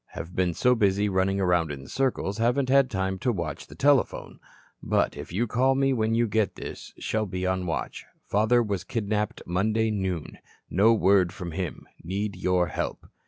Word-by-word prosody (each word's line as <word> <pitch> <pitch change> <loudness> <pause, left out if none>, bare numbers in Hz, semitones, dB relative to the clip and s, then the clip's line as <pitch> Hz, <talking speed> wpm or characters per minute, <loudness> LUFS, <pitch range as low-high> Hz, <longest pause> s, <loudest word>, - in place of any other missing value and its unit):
Have 85 +2 -7
been 90 -2 +1
so 125 0 +3
busy 100 -3 +2
running 95 +1 +1
around 90 -4 +2
in 70 -2 -7
circles, 120 - -1
haven't 125 +3 +1
had 135 -1 +5
time 95 -3 -2
to 125 - +1
watch 85 -8 -4
the 70 - -13
telephone. 140 - +1 0.4
But - - +1
if - - -8
you 105 +7 0
call 130 +4 +2
me 135 0 +2
when 110 -2 +1
you 120 0 +2
get 110 -1 0
this - - -8
shall 110 -1 -1
be 90 0 -3
on 95 0 +1
the 90 - -5
watch. 80 - -4 0.2
Father 110 +4 +3
was 100 -5 -2
kidnapped 105 0 -2
Monday 110 +5 +1
noon. 95 -6 -3 0.3
No 105 +5 +5
word 95 -5 +4
from 90 -3 -7
him. 90 -1 -5 0.2
Need 100 +3 -3
your 90 -1 +1
help." - - -4
100 Hz, 185 wpm, -26 LUFS, 90-115 Hz, 0.4 s, had